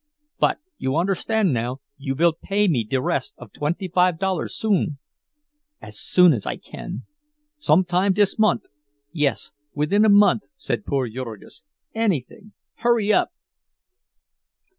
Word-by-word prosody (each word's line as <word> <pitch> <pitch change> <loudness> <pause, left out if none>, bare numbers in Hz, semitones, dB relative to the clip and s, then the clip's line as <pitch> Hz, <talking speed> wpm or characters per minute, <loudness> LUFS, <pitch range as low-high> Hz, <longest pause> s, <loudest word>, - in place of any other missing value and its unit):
—But - - +2 0.2
you 130 +1 -1
understand 195 +1 +1
now—you 135 +3 -4
vill 170 +3 +3
pay 200 +5 0
me 135 -10 +1
de 120 +5 -1
rest - - -2
of - - -13
twenty 165 +6 -2
five 180 -1 +2
dollars 190 +1 -2
soon?" 195 -9 0 0.8
"As - - -8
soon 180 -3 +5
as 115 - -4
I - - -2
can." 60 - -8 0.6
"Some 185 - +3
time 185 +2 +2
dis 205 +2 +2
mont'?" 215 -1 +3 0.5
"Yes, 150 -5 -1 0.2
within 150 +9 +2
a 220 - +5
month," 205 +1 +5
said 270 -6 -4
poor 135 -3 0
Jurgis. 115 +2 -8 0.3
"Anything! 210 - -2 0.2
Hurry 225 -3 +2
up!" - - +3
175 Hz, 135 wpm, -23 LUFS, 140-205 Hz, 0.8 s, soon